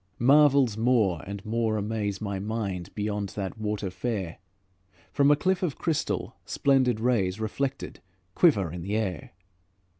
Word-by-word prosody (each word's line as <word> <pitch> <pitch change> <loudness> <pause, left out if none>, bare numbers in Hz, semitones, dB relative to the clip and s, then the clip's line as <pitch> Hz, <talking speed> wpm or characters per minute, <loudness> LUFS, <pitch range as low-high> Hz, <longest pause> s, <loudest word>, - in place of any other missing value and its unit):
Marvels 135 -3 +5
more 110 -8 +2
and 100 0 -7
more 110 0 0
amaze 105 -1 -2
My 100 -3 -3
mind 100 -4 -3
beyond 105 -1 -2
that 100 +1 -4
water 105 -3 -2
fair: 95 -3 -4 0.7
From 140 0 +3
a 145 - +6
cliff 185 +5 0
of 170 -7 -2
crystal, 165 -3 -2
splendid 130 -5 +2
rays, 110 -5 +1
Reflected, 135 +5 -3 0.3
quiver 100 - +3
in 90 +1 -6
the 100 +5 -3
air. 95 -8 -3
110 Hz, 140 wpm, -27 LUFS, 100-125 Hz, 0.7 s, a